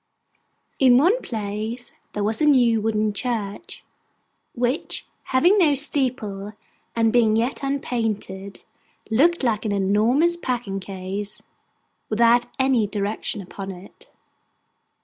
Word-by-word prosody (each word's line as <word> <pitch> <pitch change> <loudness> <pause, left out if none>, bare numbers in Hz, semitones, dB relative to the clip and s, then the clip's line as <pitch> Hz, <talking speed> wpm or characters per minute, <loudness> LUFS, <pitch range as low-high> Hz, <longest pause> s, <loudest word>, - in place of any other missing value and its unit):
In 255 -2 +6
one 375 - +3
place, 220 +2 -5 0.2
there 205 - -2
was 220 +5 -1
a 305 - +4
new 240 -6 +4
wooden 215 -1 0
church, 220 - -4 0.7
which, 245 +5 -2 0.2
having 350 +11 +4
no 305 -6 +4
steeple, 245 -8 0 0.4
and 225 -1 +2
being 225 -3 +4
yet 235 +4 0
unpainted, 220 -8 -3 0.5
looked 320 +8 +3
like 225 -4 +1
an 215 - -1
enormous 215 - +2
packing 240 -10 -3
case 195 +2 -6 0.7
without 235 +2 +4
any 260 -5 +2
direction 205 0 -3
upon 195 +1 -8
it. 190 +1 -12
225 Hz, 110 wpm, -23 LUFS, 205-260 Hz, 0.7 s, In